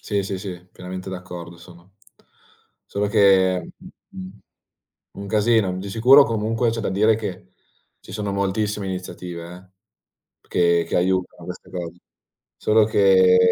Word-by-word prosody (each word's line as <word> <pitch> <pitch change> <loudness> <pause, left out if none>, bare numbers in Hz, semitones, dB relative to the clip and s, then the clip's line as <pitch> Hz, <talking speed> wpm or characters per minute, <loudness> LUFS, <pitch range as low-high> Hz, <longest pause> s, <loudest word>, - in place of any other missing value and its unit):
Sì, 100 -2 -2
sì, 95 0 -4
sì, 90 -2 -8
pienamente 90 +1 -8
d'accordo 90 -2 -8
sono. 90 +2 -17 0.9
Solo 100 +1 -2
che 95 -4 +3
mh - - -13 0.2
mhmm, 95 +2 -10 0.7
un 100 0 -8
casino. 105 -2 +2
Di 100 +1 -6
sicuro 125 +7 +6
comunque 115 -1 0
c'è 115 0 -3
da - - -2
dire 105 +3 +3
che 95 -4 -7 0.5
ci - - -14
sono 105 -1 -3
moltissime 100 +1 -1
iniziative 90 -2 -7 0.9
eh, - - -29
che 85 -1 +2
che - - -2
aiutano 95 +1 -1
queste - - -9
cose. 90 -1 -7 0.6
Solo 110 0 +3
che 95 -3 +5
95 Hz, 140 wpm, -22 LUFS, 90-105 Hz, 0.9 s, sicuro